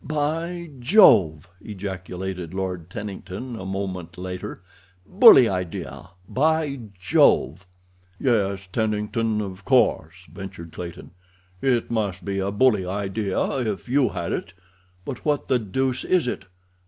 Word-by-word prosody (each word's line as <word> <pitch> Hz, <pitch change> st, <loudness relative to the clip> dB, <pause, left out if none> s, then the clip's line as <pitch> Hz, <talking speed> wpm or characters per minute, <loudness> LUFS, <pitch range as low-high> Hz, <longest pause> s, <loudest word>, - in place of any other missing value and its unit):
"By 165 Hz, +3 st, -2 dB
Jove!" 110 Hz, -, +5 dB, 0.2 s
ejaculated 95 Hz, -3 st, -6 dB
Lord 90 Hz, -3 st, -4 dB
Tennington, 105 Hz, +4 st, -6 dB
a 95 Hz, -3 st, -7 dB
moment 95 Hz, -3 st, -5 dB
later. 90 Hz, +2 st, -6 dB, 0.4 s
"Bully 185 Hz, -, +8 dB
idea, 90 Hz, -3 st, -5 dB, 0.2 s
by 150 Hz, 0 st, +1 dB, 0.2 s
Jove!" 90 Hz, -1 st, +3 dB, 0.5 s
"Yes, 100 Hz, -6 st, 0 dB
Tennington, 110 Hz, 0 st, 0 dB
of 95 Hz, -1 st, -7 dB
course," 130 Hz, +1 st, +2 dB, 0.2 s
ventured 95 Hz, -3 st, -9 dB
Clayton; 85 Hz, 0 st, -8 dB, 0.5 s
"it 125 Hz, -4 st, +1 dB
must 100 Hz, -6 st, -2 dB
be 100 Hz, 0 st, -2 dB
a 95 Hz, +1 st, -1 dB
bully 105 Hz, -1 st, +3 dB
idea 100 Hz, +4 st, -2 dB
if 110 Hz, -7 st, -3 dB
you 130 Hz, +1 st, +3 dB
had 85 Hz, -, -4 dB
it, 90 Hz, -, -4 dB, 0.5 s
but 130 Hz, -3 st, -6 dB
what 150 Hz, -2 st, -1 dB
the 130 Hz, -, +3 dB
deuce 125 Hz, +4 st, -1 dB
is 180 Hz, -8 st, +2 dB
it? 110 Hz, -, -4 dB
100 Hz, 120 wpm, -24 LUFS, 95-130 Hz, 0.5 s, Bully